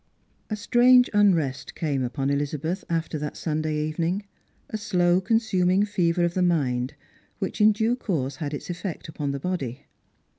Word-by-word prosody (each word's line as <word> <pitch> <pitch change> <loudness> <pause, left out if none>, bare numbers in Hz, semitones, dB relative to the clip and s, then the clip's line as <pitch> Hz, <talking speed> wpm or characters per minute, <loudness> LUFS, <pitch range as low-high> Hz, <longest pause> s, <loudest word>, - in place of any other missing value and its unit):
A 215 - -1
STUANGE 245 +4 +5
unrest 170 -10 +2
came 145 -5 -1
Tipon 135 +2 -1
Elizabeth 150 +5 -2
after 165 -2 -1
that 150 0 -5
Sunday 155 -1 -1
evening, 165 +6 -1 0.5
a - - -3
slow 180 -3 +2
consuming 195 -3 +2
fever 175 -4 +1
of 170 - -1
the 185 - 0
mind, 135 -8 +1 0.4
which - - -3
in 215 +1 +7
due 220 +3 +1
course 145 - -2
had 145 -3 -4
its 150 +4 -5
effect 180 0 -5
upon 150 -2 -4
the 140 0 -2
body. 140 -6 -4
170 Hz, 155 wpm, -25 LUFS, 145-200 Hz, 0.5 s, in